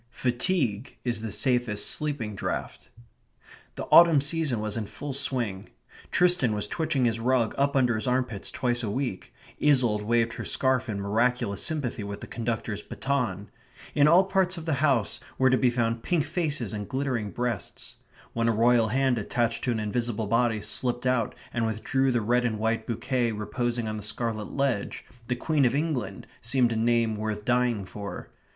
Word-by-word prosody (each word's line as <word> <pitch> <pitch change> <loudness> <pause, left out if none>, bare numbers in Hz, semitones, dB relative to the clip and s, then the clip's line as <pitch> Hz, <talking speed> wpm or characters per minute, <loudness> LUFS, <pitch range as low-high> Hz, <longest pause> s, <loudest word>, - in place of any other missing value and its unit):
Fatigue 125 - -1
is 120 -3 -2
the 110 - -4
safest 120 -2 +1
sleeping 145 -8 -1
draught. 100 - -5 0.9
The - - -5
autumn 165 -3 +8
season 145 -4 0
was 105 -1 -1
in 110 -3 -3
full 135 +7 -6
swing. 125 -8 -1 0.4
Tristan 175 -11 +3
was 105 0 -1
twitching 155 0 0
his 115 -1 +1
rug 120 -1 +1
up 140 +1 +1
under 125 -3 +3
his 110 +1 -2
armpits 125 -5 -1
twice 120 -1 0
a 110 - -2
week; 125 -3 -3 0.3
Isolde 125 -8 +3
waved 115 +1 +1
her - - -6
scarf 130 -2 +1
in 100 -2 -3
miraculous 105 +1 0
sympathy 130 -8 -1
with 100 0 -6
the - - -6
conductor's 115 -3 -3
baton. 120 -9 -3 0.4
In 145 0 +4
all 175 +4 +6
parts 190 -1 0
of 165 - -7
the 160 - 0
house 130 -9 +2 0.2
were 130 -1 +4
to - - +5
be 125 - +4
found 115 -1 -1
pink 165 0 0
faces 150 - -2
and 105 -1 -5
glittering 130 -6 -2
breasts. 120 -2 -4 0.4
When 115 0 0
a - - +4
Royal 115 +1 +4
hand 130 +1 +1
attached 115 +2 -1
to 125 - +1
an 115 - -1
invisible 110 +1 -1
body 115 0 +1
slipped 125 +3 -1
out 125 -3 +1 0.2
and 120 - 0
withdrew 130 +5 0
the 120 -2 +1
red 120 +3 +2
and 115 -3 -1
white 110 +1 -1
bouquet 120 0 -1
reposing 120 +2 -2
on 110 0 -3
the - - -6
scarlet 110 0 -3
ledge, 135 -7 -1 0.2
the 125 - 0
Queen 150 +3 +1
of 125 +1 +3
England 145 -8 -2 0.2
seemed 120 0 +1
a - - -1
name 115 -1 +1
worth 105 -1 -4
dying 120 -5 +1
for. 100 +1 -8
120 Hz, 175 wpm, -27 LUFS, 110-130 Hz, 0.9 s, autumn